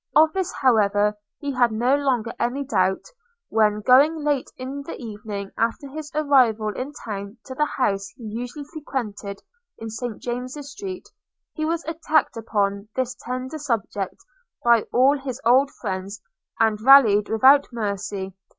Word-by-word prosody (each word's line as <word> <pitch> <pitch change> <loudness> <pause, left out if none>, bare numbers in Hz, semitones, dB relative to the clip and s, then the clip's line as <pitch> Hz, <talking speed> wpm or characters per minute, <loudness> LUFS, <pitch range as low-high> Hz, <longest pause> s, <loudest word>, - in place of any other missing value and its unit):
Of 315 0 +6
this, 380 -2 -1
however, 210 -4 +3 0.3
he 285 -1 -2
had 245 -3 +3
no 240 +5 +2
longer 255 -5 0
any 250 +4 -1
doubt, 190 -7 +1 0.5
when, 210 -1 +2
going 290 +7 +5
late 290 -3 0
in 265 +2 -5
the 280 - -8
evening 210 -3 -6
after 230 +5 0
his 295 +2 -8
arrival 255 -8 +3
in 265 +3 -4
town 200 0 -6
to 260 - -7
the 300 +3 +1
house 195 -6 0
he 240 - -12
usually 245 +6 -6
frequented 215 -10 -5 0.3
in 225 0 -7
St 230 0 -5
James's 255 +4 -5
street, 370 +4 -7 0.5
he 310 - -2
was 335 +1 -1
attacked 315 -2 +1
upon 205 -2 -1
this 255 -1 -1
tender 255 +4 -5
subject 225 -7 -2 0.5
by 235 -2 +4
all 270 +4 +4
his 265 -2 -5
old 260 +4 +5
friends, 195 -1 -4 0.4
and 220 -1 +2
rallied 225 -5 +7
without 265 +6 +6
mercy. 200 -4 -4
245 Hz, 150 wpm, -23 LUFS, 210-280 Hz, 0.5 s, rallied